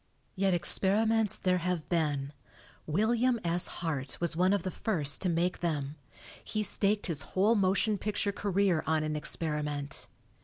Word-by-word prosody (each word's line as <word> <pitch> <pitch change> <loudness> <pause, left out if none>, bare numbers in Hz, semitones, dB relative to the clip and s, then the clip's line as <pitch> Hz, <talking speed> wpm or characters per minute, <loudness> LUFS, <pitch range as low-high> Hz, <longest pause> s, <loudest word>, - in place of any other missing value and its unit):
Yet 190 -1 +2
experiments 210 +4 +3
there 180 -1 +1
have 175 -2 -2
been. 150 -4 -1 0.5
William 230 +8 +2
S. 170 +1 +2
Hart 145 -6 -4
was 170 -1 0
one 180 +3 +3
of 200 -4 +1
the 185 - -3
first 155 -9 -2
to 185 - +1
make 175 +2 0
them; 150 -4 -2 0.5
he 215 -1 -2
staked 205 0 +1
his 160 -5 -2 0.2
whole 205 +4 +4
motion 200 0 +1
picture 205 0 -1
career 195 -4 +1
on 155 -1 +1
an 155 0 -2
experiment. 150 -2 -2
180 Hz, 150 wpm, -30 LUFS, 155-200 Hz, 0.5 s, whole